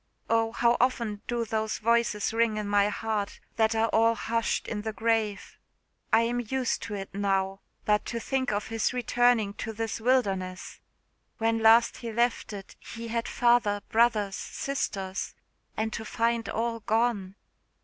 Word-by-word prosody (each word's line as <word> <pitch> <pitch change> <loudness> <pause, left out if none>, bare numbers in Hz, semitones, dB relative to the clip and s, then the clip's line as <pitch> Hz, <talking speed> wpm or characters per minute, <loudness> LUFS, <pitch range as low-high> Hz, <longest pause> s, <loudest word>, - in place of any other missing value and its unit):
Oh, 225 0 +2
how 235 +1 +2
often 235 -4 0
do 240 -1 -1
those 220 0 -1
voices 230 -2 +1
ring 225 -1 +2
in 210 -1 -3
my 205 0 +3
heart, 210 -1 -3 0.2
that 220 0 +3
are 225 0 +3
all 230 +1 +3
hushed 230 0 -1
in 210 -2 -3
the 220 +1 -3
grave! 220 -2 -1 0.5
I 225 - +6
am 240 +1 0
used 250 +2 -1
to 210 - -5
it 195 -1 -7
now; 195 -1 0 0.3
but 210 0 +2
to 235 - -3
think 260 0 -1
of 205 0 -2
his 225 +1 0
returning 245 -3 +2
to 225 - -3
this 225 0 -3
wilderness! 195 -7 0 0.6
When 225 0 +1
last 225 +1 +5
he 235 -2 -6
left 235 +1 0
it 200 -2 -9
he 230 0 -8
had 230 0 -1
father, 235 -4 +2
brothers, 220 -4 +2
sisters 195 -8 -3 0.4
and 220 0 -1
to 225 - -4
find 230 +1 0
all 230 0 -1
gone!" 220 -4 0
225 Hz, 160 wpm, -28 LUFS, 210-235 Hz, 0.6 s, I